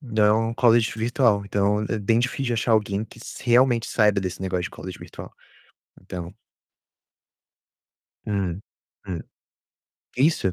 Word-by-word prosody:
Não 110 -3 +2
o - - -5
college 115 -2 +4
virtual. 115 -2 +2
Então, 100 +1 +1
é 110 - -1
bem 115 +3 +2
difícil 125 +2 -1
de 120 - 0
achar 115 +1 +1
alguém 105 -1 +1
que 115 - -16
se - - -9
realmente 120 -1 +4
saiba 105 -3 +2
desse 95 -1 -4
negócio 90 -2 -2
de - - -5
college 95 -1 -8
virtual, - - -10 0.7
então. 90 -1 -7 1.9
Hum, 95 -4 -2 0.5
hum. 90 -4 -4 1.0
Isso. 130 - +2
105 Hz, 135 wpm, -24 LUFS, 95-120 Hz, 1.9 s, college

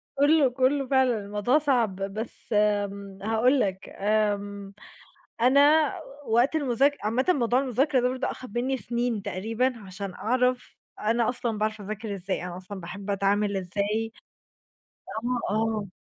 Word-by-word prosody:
كله، 285 0 +4
كلّه 260 +2 +1
فعلًا 260 -3 +3
الموضوع 210 +7 +1
صعب، 250 -9 +1
بس 200 +5 -5
آمم، 200 -2 0
هاقول 225 +5 +3
لك، 190 -4 -2
آمم، 205 -1 -1 0.7
أنا 285 +6 +5 0.3
وقت 240 +7 +3
المذاكرة 280 0 +2
عامةً 230 +5 +1
موضوع 250 -7 +3
المذاكرة 270 +1 +1
ده 250 - +2
برضو 255 +1 -2
أخد 240 -2 -5
مِنّي 265 +2 0
سنين 235 -1 -2
تقريبًا 225 +7 -1
عشان 190 0 -6
أعرف 250 +3 0 0.2
أنا 225 +2 +1
أصلًا 235 -3 -2
باعرف 215 0 -1
أذاكر 210 +1 -5
إزاي، 190 -1 -3
أنا 180 -1 -6
أصلًا 190 +2 -8
باحب 190 +4 -7
أتعامل 200 +1 +1
إزاي. 205 +4 -2 1.4
آه، - - 0
آه. 220 -1 0
225 Hz, 135 wpm, -26 LUFS, 200-255 Hz, 1.4 s, أنا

